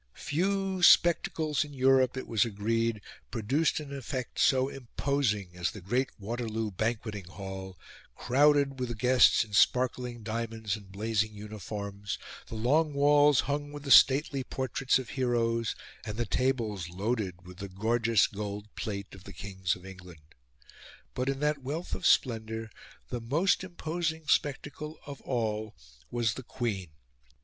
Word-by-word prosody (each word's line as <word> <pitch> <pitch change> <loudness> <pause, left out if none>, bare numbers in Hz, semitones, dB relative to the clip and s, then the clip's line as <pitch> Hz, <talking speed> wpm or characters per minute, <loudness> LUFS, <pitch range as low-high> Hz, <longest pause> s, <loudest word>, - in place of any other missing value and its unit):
Few 190 +3 -1
spectacles 160 -3 +4
in 145 -1 -10
Europe, 130 -1 +4
it 130 - -5
was 110 -3 +3
agreed, 115 0 -1 0.3
produced 135 +10 +1
an 140 -2 -7
effect 130 -1 -5
so 130 -1 +4
imposing 125 -6 -1
as 90 0 -1
the 105 - -9
great 120 +8 0
Waterloo 110 0 -3
banqueting 110 -1 -2
hall, 95 0 -8 0.4
crowded 140 +1 +3
with 120 -3 -3
guests 125 +2 +5
in 105 -2 -14
sparkling 125 +1 +2
diamonds 110 -1 -3
and 100 -3 -12
blazing 110 +1 -1
uniforms, 100 -1 -6 0.3
the - - -7
long 145 +7 +2
walls 145 0 +5
hung 145 +1 -3
with 145 -1 -8
the 140 - -3
stately 135 0 +6
portraits 130 +1 0
of 130 -3 -6
heroes, 115 -3 0 0.3
and 105 -2 -6
the 120 - 0
tables 115 -10 -1
loaded 95 -2 -3
with 90 0 -12
the 100 -1 -6
gorgeous 115 +3 +2
gold 105 0 -6
plate 100 -2 -5
of 95 -1 -13
the 100 - -10
kings 95 0 -2
of 90 - -14
England. 90 -5 -13 0.8
But, 130 +1 -1
in 135 0 -2
that 150 -1 +1
wealth 150 +7 -4
of - - 0
splendour, 110 -2 +1 0.4
the 120 - -3
most 155 +13 +1
imposing 165 -2 -3
spectacle 150 +1 -1
of 140 -1 -8
all 110 -3 -2 0.3
was 120 -3 0
the - - -7
Queen. 115 -8 -3
115 Hz, 145 wpm, -29 LUFS, 105-140 Hz, 0.8 s, stately